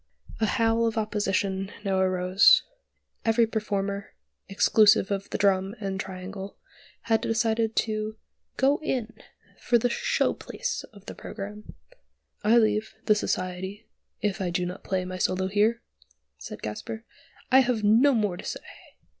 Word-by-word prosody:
A 220 - +2
howl 230 0 +2
of 225 0 -2
opposition 195 -2 -1
now 190 -1 +1
arose. 185 +2 +5 0.6
Every 225 +1 +4
performer, 200 -2 -3 0.3
exclusive 205 0 +4
of 195 0 -2
the - - -2
Drum 195 0 +2
and 195 -2 -3
the - - -1
Triangle, 190 +1 -8 0.4
had 225 -1 +1
decided 225 0 0
to 215 0 -1 0.4
"go 275 +3 +3
in" 245 -7 -2 0.5
for 240 - +3
the 240 +1 0
"show - - +1
place" - - -4
in 200 -3 -16
the - - -7
programme. 210 +1 -8 0.7
"I 220 +3 +5
leave 215 -1 +1
the 215 - +5
Society 190 +1 -3 0.4
if 205 -1 -1
I 185 - 0
do 180 +1 -1
not 180 +2 -6
play 185 -1 -1
my 185 0 -6
solo 185 +1 +1
here," 210 +4 +1 0.6
said - - -9
Gasper. 220 - -6 0.5
"I 260 - +8
have 245 -4 +1
no 240 +7 +5
more 205 -5 0
to - - -9
say!" - - -6
210 Hz, 145 wpm, -26 LUFS, 190-225 Hz, 0.7 s, I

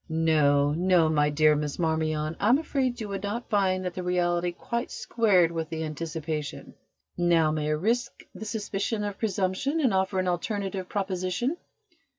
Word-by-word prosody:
"No, 150 -3 +3
no, 175 0 +3
my 150 -1 +2
dear 150 +1 +4
Miss 150 -1 -3
Marmion, 160 -1 0
I - - +2
am 255 - +6
afraid 265 -5 -1
you 215 - -4
would 195 -1 -4
not 210 +4 -4
find 185 -3 +2
that 180 - -3
the 185 - -4
reality 175 -1 0
quite 235 +7 -4
squared 190 -8 +2
with 165 -2 -3
the 160 0 -3
anticipation. 155 -1 -5 0.5
Now, 170 -3 +3
may 155 -1 -1
I 155 - +1
risk 230 +10 -1
the 200 +3 -8
suspicion 210 0 -2
of 205 -1 -4
presumption 205 - 0
and 260 -8 +2
offer 190 0 +1
an 185 0 0
alternative 190 +1 -2
proposition?" 190 - -1
180 Hz, 165 wpm, -27 LUFS, 160-205 Hz, 0.5 s, am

